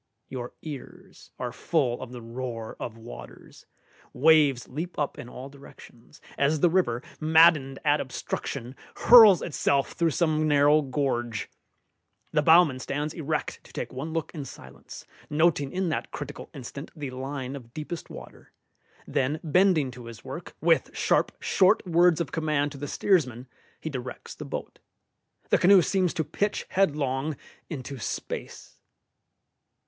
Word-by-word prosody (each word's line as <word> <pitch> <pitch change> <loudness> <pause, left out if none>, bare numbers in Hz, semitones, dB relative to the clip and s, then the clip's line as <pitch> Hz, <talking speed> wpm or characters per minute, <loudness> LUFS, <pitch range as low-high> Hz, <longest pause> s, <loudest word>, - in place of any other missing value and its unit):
Your 125 -2 -6
ears 145 -5 -10
are 125 -1 -4
full 125 -1 0
of - - -7
the 120 -2 -8
roar 115 -1 -6
of 115 -2 -6
waters; 115 +1 -12 0.5
waves 145 -2 +4
leap 165 +7 -6
up 145 -2 -2
in 120 - -8
all 130 +2 -8
directions, 140 -2 -16 0.2
as 150 +2 +2
the 175 - +4
river, 125 -10 +1 0.2
maddened 155 -4 +5
at 145 0 +3
obstruction, 130 0 -5 0.2
hurls 220 -7 +8
itself 140 -3 0
through 170 -1 +1
some 155 0 +1
narrow 145 +1 +5
gorge. 125 -6 -2 0.8
The 150 - +2
bowman 160 -4 +5
stands 145 +4 -3
erect 155 -1 -3
to - - -17
take - - -5
one 140 +5 -5
look 165 -1 -3
in 150 -4 -5
silence, - - -11 0.2
noting 150 -2 +2
in 185 -1 -1
that 160 - -2
critical - - -7
instant 140 +3 -8
the 145 -4 -5
line 130 +1 -5
of 120 -4 -11
deepest 155 +4 -6
water; - - -12 0.5
then 145 +4 -1
bending 165 -4 +3
to 120 0 -11
his 115 -3 -10
work, - - -8
with - - +2
sharp, - - +2
short 190 +2 +3
words 175 -1 +4
of 170 - -2
command 150 -2 0
to 140 - -10
the 145 - -4
steersman, 130 - +1 0.3
he 160 - -5
directs 130 -2 -7
the - - -8
boat. - - -6 0.7
The - - +5
canoe 185 0 +7
seems 185 -2 +1
to 160 - 0
pitch 200 +8 -2
headlong 150 -5 0 0.3
into 135 -3 -6
space. - - -6
145 Hz, 145 wpm, -27 LUFS, 130-160 Hz, 0.8 s, hurls